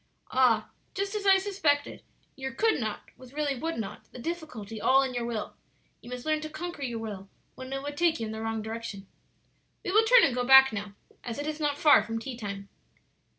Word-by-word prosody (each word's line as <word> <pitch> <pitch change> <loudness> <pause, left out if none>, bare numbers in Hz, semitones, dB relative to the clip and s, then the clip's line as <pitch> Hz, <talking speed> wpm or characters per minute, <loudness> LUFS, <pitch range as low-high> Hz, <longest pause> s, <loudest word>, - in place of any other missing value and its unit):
"Ah, 240 -4 +3 0.2
just 395 +1 -2
as 415 -2 -2
I 385 0 +8
suspected; 375 -8 0 0.3
your 265 0 -5
could 445 +5 +2
not 215 -3 -5
was 255 0 -14
really 295 -2 0
would 325 +6 -3
not; 220 -4 -7
the - - -11
difficulty 245 - -6
all 270 +4 +5
in 260 -1 -3
your 240 -1 -2
will. 225 -3 -4 0.5
You - - -12
must 250 0 -6
learn 310 0 +1
to 310 - -5
conquer 310 0 -6
your 240 -4 -3
will 205 -3 -7 0.2
when 260 0 -9
it 270 0 -3
would 290 0 -5
take 335 -1 +2
you 225 - -2
in 215 - -5
the 220 0 -5
wrong 225 -1 -2
direction. 220 -3 -6 0.8
"We - - -1
will 430 +3 +5
turn 485 +1 +7
and 265 - +3
go 250 0 0
back 265 0 +8
now, 205 -1 -5 0.3
as 235 -2 -5
it 290 - -4
is 310 0 -4
not 290 -2 0
far 300 -1 +6
from 225 +1 -4
tea 245 +2 -5
time." 200 -3 -6
265 Hz, 220 wpm, -28 LUFS, 225-310 Hz, 0.8 s, I